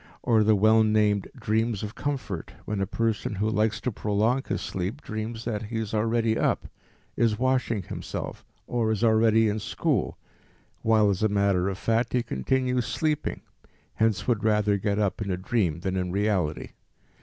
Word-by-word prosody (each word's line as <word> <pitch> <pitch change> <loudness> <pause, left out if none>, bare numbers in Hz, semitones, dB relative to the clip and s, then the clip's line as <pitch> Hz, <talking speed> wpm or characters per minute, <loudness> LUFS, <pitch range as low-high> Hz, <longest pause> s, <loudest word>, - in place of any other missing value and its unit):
Or 115 -3 +4
the 110 0 +4
well 110 +2 +5
named 105 -2 +2
dreams 110 -1 0
of 105 +1 -5
comfort, 130 - -4
when 105 -2 -2
a 95 - 0
person 110 -1 -1
who 105 +3 0
likes 110 0 +1
to 125 - -1
prolong 110 +5 +1
his - - -2
sleep, 95 +9 -4
dreams 110 +1 -5
that 110 -3 -2
he 115 +2 -4
is 110 -2 -3
already 115 +1 +1
up, - - 0 0.5
is 115 -2 +2
washing 125 -4 0
himself, - - -6 0.2
or 115 -2 0
is 110 +1 -1
already 110 0 +4
in 105 +1 -1
school, - - -1 0.6
while 110 -2 +4
as 95 - -2
a 110 - +3
matter 100 -2 +2
of 95 - -4
fact 115 +3 0
he 125 -1 +2
continues 125 - 0
sleeping, 155 -1 -1 0.5
hence 110 -4 +1
would 115 -3 +1
rather 105 -1 +3
get 100 +1 -1
up 105 -1 0
in 100 - -3
a 90 - 0
dream 90 -4 0
than 95 0 -2
in 90 -1 -1
reality. 95 -6 0
110 Hz, 175 wpm, -26 LUFS, 100-115 Hz, 0.6 s, well